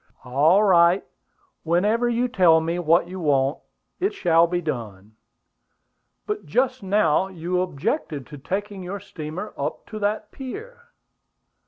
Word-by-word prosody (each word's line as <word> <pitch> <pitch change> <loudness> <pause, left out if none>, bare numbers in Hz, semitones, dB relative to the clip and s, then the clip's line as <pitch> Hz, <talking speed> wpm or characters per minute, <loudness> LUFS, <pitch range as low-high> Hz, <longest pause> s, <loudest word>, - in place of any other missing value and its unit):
"All 150 +11 +4
right. 175 -1 +4 0.6
Whenever 210 +9 +1
you 240 +1 +1
tell 180 -9 +5
me 165 +2 -2
what 170 +1 +3
you 185 +1 -7
want, 140 -2 +1 0.4
it 395 +3 0
shall 170 - +4
be 175 +1 -1
done." 110 - -6 1.1
"But 420 0 -3
just 255 +1 0
now 190 -3 +2
you 180 0 -2
objected 155 - -2
to 145 +1 -11
taking 200 +6 -4
your 185 +3 -5
steamer 180 0 -7
up - - -4
to 215 - -5
that 210 +1 -2
pier." 470 - -9
180 Hz, 135 wpm, -23 LUFS, 160-215 Hz, 1.1 s, tell